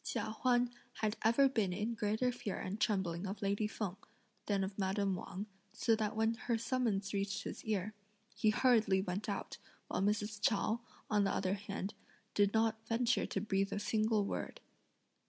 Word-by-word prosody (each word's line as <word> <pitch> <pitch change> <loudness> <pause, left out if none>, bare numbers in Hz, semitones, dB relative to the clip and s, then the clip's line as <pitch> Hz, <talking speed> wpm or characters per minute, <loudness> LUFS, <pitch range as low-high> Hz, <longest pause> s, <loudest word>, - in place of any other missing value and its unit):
Chia 215 -1 -2
Huan 245 -1 +3 0.2
had 215 0 -1
ever 235 +5 +6
been 220 -8 +1
in 210 +5 -1
greater 220 +3 +1
fear 245 -4 -4
and 200 +4 -4
trembling 190 -3 +1
of 195 +1 -5
lady 200 +2 +1
Feng, 200 -3 -4 0.5
than 200 -2 +2
of 195 +1 -4
madame 195 0 +1
Wang, 185 +2 -5 0.3
so 225 - +3
that 215 -1 -1
when 220 +1 +2
her 230 0 -1
summons 225 -5 0
reached 200 0 -1
his - - -6
ear, 215 -1 -1 0.4
he 215 - +2
hurriedly 215 -5 +4
went 195 +3 -3
out, 200 - -4 0.3
while - - 0
Mrs. 210 +1 0
Chao, 225 -1 +2 0.3
on 210 -2 +3
the 195 - +2
other 190 0 0
hand, 200 -1 -4 0.4
did 205 -1 +4
not 225 0 +1
venture 235 +1 +2
to - - -1
breathe 195 -2 0
a - - -1
single 215 0 +2
word. - - -4
210 Hz, 175 wpm, -35 LUFS, 195-225 Hz, 0.5 s, ever